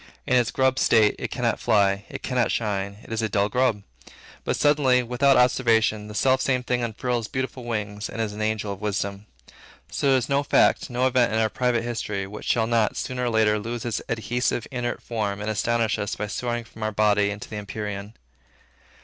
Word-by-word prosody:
In 130 Hz, -, +2 dB
its 120 Hz, -2 st, +3 dB
grub 130 Hz, 0 st, +1 dB
state, 110 Hz, -2 st, +4 dB
it -, -, -3 dB
cannot -, -, -1 dB
fly, 100 Hz, -3 st, +2 dB
it -, -, -7 dB
cannot 125 Hz, -3 st, +1 dB
shine, 100 Hz, -2 st, -2 dB
it -, -, -8 dB
is 115 Hz, -, -1 dB
a 110 Hz, -, -1 dB
dull 100 Hz, 0 st, +1 dB
grub. 125 Hz, -5 st, +1 dB, 0.6 s
But -, -, -1 dB
suddenly, 135 Hz, -4 st, +3 dB
without 130 Hz, +3 st, +3 dB
observation, 115 Hz, -4 st, +3 dB
the 105 Hz, -, -9 dB
selfsame 130 Hz, +1 st, +2 dB
thing 125 Hz, 0 st, 0 dB
unfurls 120 Hz, 0 st, -2 dB
beautiful 130 Hz, -1 st, -4 dB
wings, 105 Hz, -2 st, -3 dB
and -, -, -7 dB
is 110 Hz, -2 st, -1 dB
an 105 Hz, -, -6 dB
angel 110 Hz, -1 st, -1 dB
of 95 Hz, -, -12 dB
wisdom. 100 Hz, -1 st, -3 dB, 0.6 s
So 140 Hz, -1 st, +2 dB
is 130 Hz, -2 st, +1 dB
there 140 Hz, 0 st, +1 dB
no -, -, +1 dB
fact, 145 Hz, -, +3 dB
no 125 Hz, +1 st, 0 dB
event, 125 Hz, -2 st, +3 dB
in -, -, +1 dB
our 110 Hz, -1 st, +2 dB
private 120 Hz, 0 st, 0 dB
history, 105 Hz, -4 st, -3 dB
which 105 Hz, +2 st, -9 dB
shall 115 Hz, -2 st, +2 dB
not, 115 Hz, -2 st, +1 dB
sooner 125 Hz, -1 st, -2 dB
or -, -, +1 dB
later, 110 Hz, -2 st, +2 dB
lose 115 Hz, +3 st, -5 dB
its 120 Hz, -, -2 dB
adhesive, 120 Hz, +1 st, -1 dB
inert 120 Hz, -2 st, -3 dB
form, 105 Hz, -4 st, -2 dB
and 105 Hz, +1 st, -2 dB
astonish 115 Hz, 0 st, 0 dB
us 105 Hz, -, -2 dB
by 105 Hz, -, -3 dB
soaring 120 Hz, +3 st, -3 dB
from 115 Hz, -1 st, -15 dB
our 110 Hz, 0 st, -1 dB
body 105 Hz, -1 st, +3 dB
into 100 Hz, 0 st, -6 dB
the 105 Hz, -, -6 dB
empyrean. 105 Hz, 0 st, -6 dB
115 Hz, 200 wpm, -24 LUFS, 105-125 Hz, 0.6 s, state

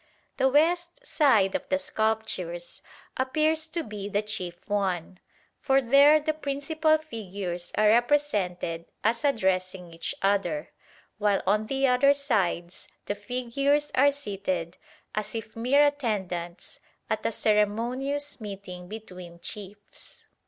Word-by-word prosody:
The 265 Hz, -, +3 dB
west 345 Hz, -, +1 dB
side 225 Hz, -, +3 dB
of -, -, -3 dB
the 280 Hz, -, +3 dB
sculptures 215 Hz, -9 st, -2 dB, 0.4 s
appears 310 Hz, +4 st, +1 dB
to 330 Hz, +1 st, -3 dB
be 205 Hz, -2 st, -6 dB
the 205 Hz, +1 st, 0 dB
chief 185 Hz, -5 st, -6 dB
one, 185 Hz, -3 st, -1 dB, 0.4 s
for 270 Hz, -2 st, +3 dB
there 280 Hz, +4 st, +6 dB
the 310 Hz, +1 st, -1 dB
principal 310 Hz, +2 st, +1 dB
figures 195 Hz, -, -6 dB
are 215 Hz, -, +5 dB
represented 210 Hz, -, +1 dB, 0.2 s
as 230 Hz, +4 st, +1 dB
addressing 185 Hz, -, 0 dB
each 165 Hz, -, -4 dB
other, 195 Hz, -6 st, 0 dB, 0.5 s
while 205 Hz, -2 st, +2 dB
on 215 Hz, +2 st, +2 dB
the 270 Hz, +2 st, +1 dB
other 265 Hz, +2 st, +5 dB
sides 195 Hz, -11 st, -1 dB, 0.2 s
the -, -, -1 dB
figures 255 Hz, +7 st, 0 dB
are 280 Hz, +2 st, +5 dB
seated 195 Hz, -, -3 dB, 0.4 s
as 215 Hz, +1 st, -3 dB
if 225 Hz, -1 st, -6 dB
mere 255 Hz, +6 st, +4 dB
attendants 190 Hz, -11 st, -3 dB, 0.3 s
at -, -, -2 dB
a -, -, 0 dB
ceremonious 240 Hz, +8 st, 0 dB
meeting 195 Hz, -3 st, -8 dB
between 185 Hz, -5 st, -9 dB
chiefs. 205 Hz, +2 st, -9 dB
220 Hz, 125 wpm, -27 LUFS, 190-280 Hz, 0.5 s, there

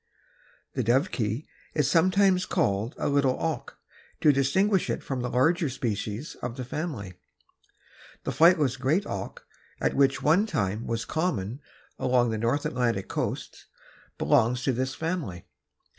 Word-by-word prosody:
The -, -, -1 dB
Dovekie 120 Hz, -, 0 dB, 0.3 s
is 150 Hz, -4 st, +2 dB
sometimes 185 Hz, +4 st, +3 dB
called 100 Hz, +5 st, 0 dB
a -, -, -1 dB
little 140 Hz, -2 st, +2 dB
auk 160 Hz, -2 st, -3 dB, 0.4 s
to 150 Hz, -, +6 dB
distinguish 185 Hz, +9 st, +2 dB
it -, -, -2 dB
from 130 Hz, -2 st, -3 dB
the 125 Hz, -, -2 dB
larger 160 Hz, +6 st, +2 dB
species 115 Hz, +1 st, -3 dB
of 120 Hz, +1 st, -4 dB
the 130 Hz, -, -4 dB
family. 125 Hz, -, -4 dB, 1.1 s
The -, -, -2 dB
flightless 155 Hz, -6 st, +4 dB
great 150 Hz, +10 st, +1 dB
auk, 100 Hz, -1 st, -6 dB, 0.5 s
which 135 Hz, -1 st, +3 dB
at -, -, -8 dB
one 175 Hz, +8 st, +4 dB
time 110 Hz, -, -2 dB
was 115 Hz, 0 st, -2 dB
common 135 Hz, -, -2 dB, 0.4 s
along 125 Hz, -2 st, +2 dB
the 110 Hz, -, -2 dB
north 120 Hz, +6 st, 0 dB
Atlantic 115 Hz, -6 st, -1 dB
coast, -, -, -4 dB, 0.5 s
belongs 125 Hz, +2 st, +2 dB
to 135 Hz, -, +1 dB
this 130 Hz, +2 st, -2 dB
family. 160 Hz, -, -3 dB
130 Hz, 140 wpm, -27 LUFS, 115-160 Hz, 1.1 s, to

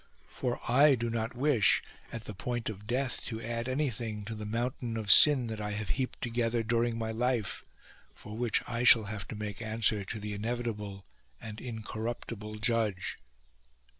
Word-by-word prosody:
For 125 Hz, -1 st, -2 dB
I 140 Hz, +4 st, +6 dB
do 120 Hz, -1 st, -2 dB
not 115 Hz, +1 st, -2 dB
wish, 125 Hz, -8 st, +3 dB, 0.3 s
at 115 Hz, -1 st, -5 dB
the 105 Hz, -, -6 dB
point 120 Hz, +4 st, -3 dB
of 105 Hz, -1 st, -8 dB
death, 130 Hz, +2 st, -1 dB
to 110 Hz, -2 st, -4 dB
add 115 Hz, +2 st, -2 dB
anything 120 Hz, -6 st, -2 dB
to 115 Hz, -, -4 dB
the 105 Hz, -1 st, -6 dB
mountain 120 Hz, +1 st, -2 dB
of 105 Hz, -3 st, +1 dB
sin 140 Hz, +1 st, +8 dB
that 110 Hz, -2 st, -4 dB
I 105 Hz, 0 st, -2 dB
have 105 Hz, -1 st, -3 dB
heaped 130 Hz, -2 st, -2 dB
together 115 Hz, -1 st, 0 dB
during 115 Hz, +1 st, +1 dB
my 110 Hz, -1 st, -2 dB
life, 120 Hz, -2 st, -1 dB, 0.5 s
for 105 Hz, -, -9 dB
which 115 Hz, -1 st, +1 dB
I 120 Hz, 0 st, -1 dB
shall 120 Hz, -2 st, +8 dB
have 105 Hz, -2 st, -5 dB
to -, -, -6 dB
make 105 Hz, 0 st, -5 dB
answer 110 Hz, -2 st, +1 dB
to 105 Hz, +3 st, -5 dB
the 105 Hz, 0 st, -4 dB
inevitable 105 Hz, -2 st, -3 dB, 0.3 s
and 110 Hz, -1 st, -7 dB
in 115 Hz, -3 st, -5 dB
corruptible 110 Hz, -1 st, -5 dB
Judge." 110 Hz, -4 st, 0 dB
115 Hz, 175 wpm, -31 LUFS, 105-120 Hz, 0.5 s, sin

